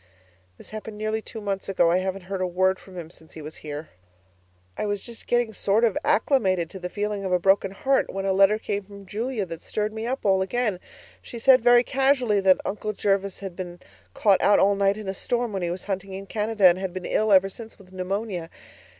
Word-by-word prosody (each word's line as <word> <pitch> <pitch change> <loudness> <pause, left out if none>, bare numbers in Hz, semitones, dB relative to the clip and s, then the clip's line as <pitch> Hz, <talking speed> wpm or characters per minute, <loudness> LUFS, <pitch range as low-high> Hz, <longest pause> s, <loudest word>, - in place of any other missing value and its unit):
This - - -14
happened 215 0 -7
nearly 215 +1 -2
two 220 0 -9
months 195 -1 -3
ago; 175 -3 +3
I 180 - +3
haven't 190 0 -3
heard 190 +1 -4
a 185 - +1
word 185 +1 +1
from 185 -2 -13
him 165 -2 -7
since 160 -2 -17
he 160 - -9
was 155 +1 -9
here. 150 +1 -7 0.9
I - - -3
was 205 -1 -2
just 235 -1 -10
getting 240 -2 +1
sort 205 +3 +1
of 225 -4 +3
acclimated 190 - +2
to 190 - -8
the 180 0 -5
feeling 205 0 -3
of 190 - -2
a 180 - +4
broken 195 +2 +3
heart, 265 +8 0
when 195 0 -4
a 195 - +2
letter 195 +2 +5
came 205 -2 -3
from 200 0 -13
Julia 215 +2 -3
that 165 -2 -8
stirred 215 0 -3
me 220 +1 -4
all 205 -7 +1
up - - +3
again. 215 -2 -1 0.4
She 240 - -9
said 255 +2 +5
very 240 +1 +6
casually 260 -5 +2
that 190 -1 +5
'Uncle 210 +1 -3
Jervis' 200 -1 -1
had 190 -3 -6
been 175 -1 -7 0.4
caught 200 -3 +3
out 205 - +5
all 200 +1 +4
night 200 0 +2
in 215 -2 -7
a 190 - -2
storm 240 +3 -2
when 195 - -2
he 175 - -1
was 175 +1 -5
hunting 195 -1 -4
in 195 +1 -6
Canada, 210 0 0
and 180 0 +6
had 190 -2 -4
been 185 -1 -6
ill 215 0 +1
ever 195 0 +6
since 220 +3 -10
with 190 -2 -18
pneumonia. 185 -2 -3
195 Hz, 230 wpm, -25 LUFS, 185-215 Hz, 0.9 s, very